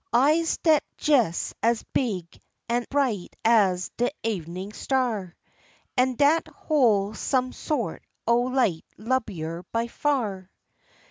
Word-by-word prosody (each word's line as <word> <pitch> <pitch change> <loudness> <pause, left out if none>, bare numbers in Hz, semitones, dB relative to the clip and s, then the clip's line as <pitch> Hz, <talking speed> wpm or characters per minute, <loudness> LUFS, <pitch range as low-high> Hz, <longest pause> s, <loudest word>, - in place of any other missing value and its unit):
Eyes 305 +7 +3
dat's 315 -3 +3 0.3
jes 235 - +2
as 230 0 +2
big 185 -10 -2 0.3
an' 240 +1 0
bright 255 -10 -1
as 195 -6 +3
de 245 +1 +2
evenin' 185 -2 -3
star; 220 -8 -1 0.6
An' 255 0 +2
dat 295 +5 +3
hol' 220 -9 +1
some 255 +3 0
sort 295 -7 -3 0.2
o' 235 +1 +4
light 250 -10 +1
lublier 190 -9 -2
by 230 0 0
far. 230 -8 -1
235 Hz, 115 wpm, -25 LUFS, 195-260 Hz, 0.6 s, o